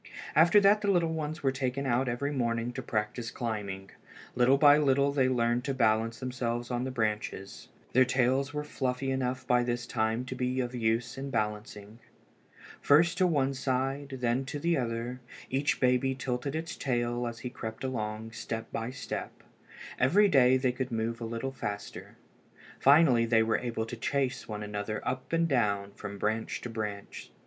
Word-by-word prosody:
After 165 +6 +7
that 205 +2 +5
the 205 - 0
little 170 -4 +2
ones 155 0 -4
were 135 - +3
taken 130 +1 -2
out 125 0 +1
every 140 +4 -2
morning 120 -3 -1
to 130 - -4
practise 115 0 -2
climbing. 100 -5 -4 0.4
Little 125 +2 +4
by 145 +1 +7
little 140 -1 +3
they 135 -2 +2
learned 120 -1 +1
to 135 -2 -1
balance 115 -1 +1
themselves 120 -1 -3
on 125 +1 -1
the - - -2
branches. 105 -4 -3 0.3
Their 130 - +6
tails 130 +2 +1
were 150 0 -3
fluffy 135 -2 -2
enough 130 -1 -2
by 125 0 +3
this 120 0 -2
time 115 +1 -1
to 130 - -5
be 125 0 -1
of 125 -1 -2
use 115 +1 -1
in 140 +1 -4
balancing. 105 -1 -4 0.8
First 170 +5 +4
to 185 - +5
one 140 -5 +1
side, 135 +1 -2
then 120 +2 +1
to 140 - -5
the 170 +3 +1
other, 120 -1 -3 0.3
each 135 +2 +1
baby 130 +1 +2
tilted 130 +2 -3
his 165 +1 -4
tail 120 -2 -1
as 115 0 -6
he 125 - -5
crept 110 -2 -7
along, 110 -3 -3
step 115 0 -5
by 115 +1 -3
step. 130 - -6 0.6
Every 195 +12 +5
day 130 -7 +5
they 130 -1 +1
could 130 +1 -4
move 115 +1 -2
a - - -3
little 115 +4 -3
faster. 100 -6 -6 0.6
Finally 135 -5 +5
they 115 -1 +4
were 110 0 +1
able 115 -2 -3
to 115 - -6
chase 135 +2 -1
one 105 -1 -5
another 105 +1 -4
up 130 0 -3
and 165 0 +2
down, 100 -8 +1
from 100 0 -8
branch 110 +2 -1
to 120 - -6
branch. 105 -3 -5
125 Hz, 175 wpm, -29 LUFS, 115-135 Hz, 0.8 s, After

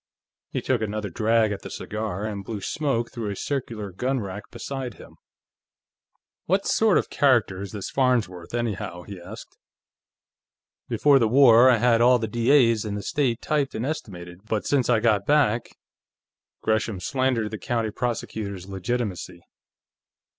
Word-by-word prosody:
He - - -3
took 125 -4 0
another 105 -2 -3
drag 110 +3 +2
at 100 - -4
the - - -8
cigar, 105 -2 -4
and 100 -2 -4
blew 105 +1 -5
smoke 125 0 -1
through 115 -3 -4
a 100 - -4
circular 115 -6 -4
gun 130 +8 -1
rack 100 +1 -7
beside 135 -4 -6
him. - - -14 1.3
"What 190 +3 +1
sort 220 -3 +3
of - - +1
a - - -29
character 120 -9 +2
is 100 - -6
this 100 -3 -6
Farnsworth, 115 -10 0
anyhow?" 105 -7 -3
he 100 -2 -9
asked. 85 - -11 1.3
"Before 145 -2 +4
the 115 - +3
war, 125 0 +7
I 125 - +5
had 115 0 +3
all 125 +1 +6
the 110 -2 -3
D.A.'s 115 0 +3
in 105 -2 -4
the 100 - -5
state 135 -8 -1
typed 145 -3 0
and 115 - -2
estimated, 90 - -6
but 110 -2 -1
since 135 -4 +1
I 115 -3 +3
got 105 -4 +2
back 130 -6 +2 0.5
" - - -65
Gresham 110 -2 0
slandered 130 -1 0
the 110 - -5
county 115 -3 -1
prosecutor's 105 -5 -4
legitimacy. 100 -2 -4
115 Hz, 160 wpm, -25 LUFS, 100-125 Hz, 1.3 s, war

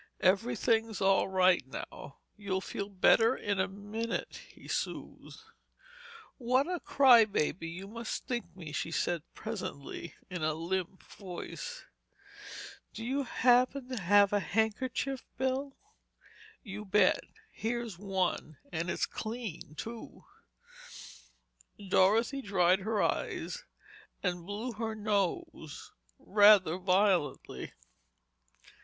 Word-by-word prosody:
Everything's 225 +2 +2
all 195 0 +3
right 185 -3 +4
now. 135 +1 -8 0.2
You'll 200 -2 -2
feel 200 +1 -5
better 225 +5 +4
in 200 -2 -2
a 190 - +2
minute," 205 +4 -4
he - - -15
soothed. - - -4 1.0
"What 255 +2 +2
a 360 0 -2
crybaby 225 - +4
you 185 +3 -7
must 230 +2 -5
think 240 -2 -4
me," 165 -5 -8
she 155 - -2
said 170 0 0
presently, 170 -7 -6
in 180 -2 -5
a 155 0 +1
limp 185 +3 -3
voice. 200 - -8 1.1
"Do 225 - -5
you 270 +3 -1
happen 250 +2 +3
to 250 -5 -3
have 200 +2 +5
a 205 - +4
handkerchief, 225 +6 -1
Bill?" 265 +1 -1 0.9
"You 210 -2 -6
bet. 210 +1 +3 0.3
Here's 230 -4 -3
one—and 180 -4 -2
it's - - 0
clean, 220 -9 -6
too." 230 +6 -8 1.7
Dorothy 225 +9 +3
dried 185 -4 +3
her 210 +1 0
eyes - - -2 0.6
and 175 -2 -2
blew 215 +5 -3
her 220 0 -3
nose 200 -7 -2 0.3
rather 200 -4 +5
violently. 185 -6 +1
205 Hz, 105 wpm, -31 LUFS, 185-230 Hz, 1.7 s, have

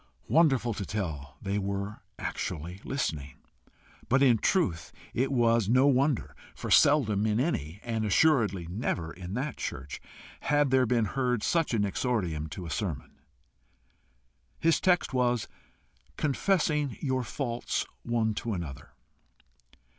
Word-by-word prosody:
Wonderful 135 -8 +3
to 100 - -4
tell, 80 -10 -4
they 100 +1 -1
were 100 +1 -3 0.2
actually 85 +6 -4
listening. 75 - -3 0.7
But 135 +2 +4
in 120 -5 +5
truth 100 - +1 0.2
it 130 +3 0
was 115 -4 +3
no 130 +3 +5
wonder, 140 -1 +2 0.2
for - - -6
seldom 110 -8 +4
in 105 +1 +1
any, 100 - -1
and 115 -2 -2
assuredly 105 - +3
never 85 -3 -3
in 90 +2 -7
that 135 +5 -3
church, 70 -1 -5 0.4
had 145 -1 +2
there 130 -1 +4
been 115 -1 +2
heard 125 0 -1
such 165 -8 +1
an 105 -2 +2
exordium 95 - -1
to 90 +5 -7
a 80 - -6
sermon. 75 -4 -3 1.5
His 165 0 +2
text 180 -5 +2
was 125 -3 +1 0.7
"Confessing 150 - +1
your 130 -2 0
faults 120 -1 -2 0.2
one 115 -2 0
to 115 +1 -3
another." 85 -8 -6
115 Hz, 130 wpm, -29 LUFS, 95-135 Hz, 1.5 s, in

